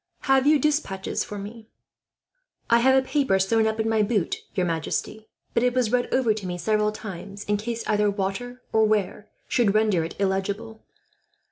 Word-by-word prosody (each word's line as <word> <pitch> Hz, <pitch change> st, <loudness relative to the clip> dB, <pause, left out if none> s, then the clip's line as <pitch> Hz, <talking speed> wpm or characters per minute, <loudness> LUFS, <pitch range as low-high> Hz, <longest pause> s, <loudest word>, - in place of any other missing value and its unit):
"Have 270 Hz, 0 st, +3 dB
you 305 Hz, 0 st, +6 dB
despatches 285 Hz, -10 st, -1 dB
for 210 Hz, -, -7 dB
me?" 215 Hz, +3 st, -9 dB, 1.0 s
"I 235 Hz, -, +6 dB
have 265 Hz, +2 st, +4 dB
a 265 Hz, -, +2 dB
paper 270 Hz, -10 st, +2 dB
sewn 220 Hz, +4 st, +2 dB
up 220 Hz, 0 st, -2 dB
in 220 Hz, -, 0 dB
my 220 Hz, -1 st, +2 dB
boot, 205 Hz, -4 st, 0 dB, 0.2 s
your 185 Hz, -, +1 dB
majesty; 170 Hz, +6 st, -3 dB, 0.3 s
but -, -, +2 dB
it 250 Hz, 0 st, +1 dB
was 245 Hz, -4 st, +1 dB
read 245 Hz, 0 st, 0 dB
over 250 Hz, -4 st, +3 dB
to 205 Hz, -3 st, -6 dB
me 175 Hz, 0 st, -3 dB
several 210 Hz, +2 st, +1 dB
times, 200 Hz, -1 st, -8 dB
in 205 Hz, 0 st, 0 dB
case 230 Hz, +2 st, -4 dB
either 210 Hz, -1 st, +2 dB
water 205 Hz, +6 st, -4 dB
or 220 Hz, -, +4 dB
wear 210 Hz, -1 st, -1 dB, 0.2 s
should 215 Hz, -5 st, +2 dB
render 215 Hz, -6 st, +3 dB
it 165 Hz, -, -7 dB
illegible." 200 Hz, +3 st, -2 dB
215 Hz, 180 wpm, -25 LUFS, 195-235 Hz, 1.0 s, you